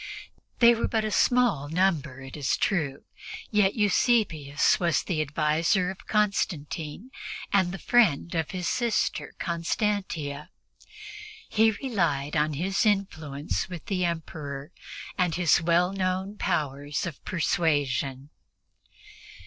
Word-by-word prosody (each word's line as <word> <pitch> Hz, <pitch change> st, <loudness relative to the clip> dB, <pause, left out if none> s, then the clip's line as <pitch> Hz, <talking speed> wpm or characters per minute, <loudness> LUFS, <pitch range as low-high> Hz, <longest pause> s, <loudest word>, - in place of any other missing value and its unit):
They 235 Hz, 0 st, +7 dB
were 230 Hz, -, -1 dB
but 220 Hz, -1 st, 0 dB
a 215 Hz, -, -2 dB
small 220 Hz, -, +2 dB
number, 160 Hz, -6 st, 0 dB
it 135 Hz, 0 st, -9 dB
is 145 Hz, -4 st, 0 dB
true, 150 Hz, -8 st, -1 dB, 0.5 s
yet 205 Hz, -2 st, +3 dB
Eusebius 200 Hz, -, +2 dB
was 170 Hz, -4 st, +1 dB
the 160 Hz, -4 st, -1 dB
adviser 155 Hz, +5 st, +1 dB
of 190 Hz, -, -13 dB
Constantine 195 Hz, -, -1 dB, 0.4 s
and 190 Hz, -3 st, +3 dB
the 195 Hz, -, -5 dB
friend 180 Hz, -9 st, +2 dB
of 165 Hz, -2 st, -1 dB
his 180 Hz, -2 st, -3 dB
sister 235 Hz, -2 st, -1 dB
Constantia. 170 Hz, -4 st, -2 dB, 1.0 s
He 220 Hz, +1 st, +4 dB
relied 170 Hz, -, -1 dB
on 150 Hz, 0 st, +1 dB
his 190 Hz, -, 0 dB
influence 160 Hz, -9 st, -1 dB
with 175 Hz, -3 st, -8 dB
the 185 Hz, -2 st, -1 dB
Emperor 155 Hz, -3 st, -4 dB, 0.5 s
and 180 Hz, -3 st, +2 dB
his 175 Hz, -1 st, +3 dB
well 175 Hz, +2 st, +2 dB
known 190 Hz, +1 st, -2 dB
powers 145 Hz, -4 st, -2 dB
of 170 Hz, -5 st, -7 dB
persuasion. 145 Hz, -6 st, 0 dB
170 Hz, 115 wpm, -27 LUFS, 150-200 Hz, 1.0 s, They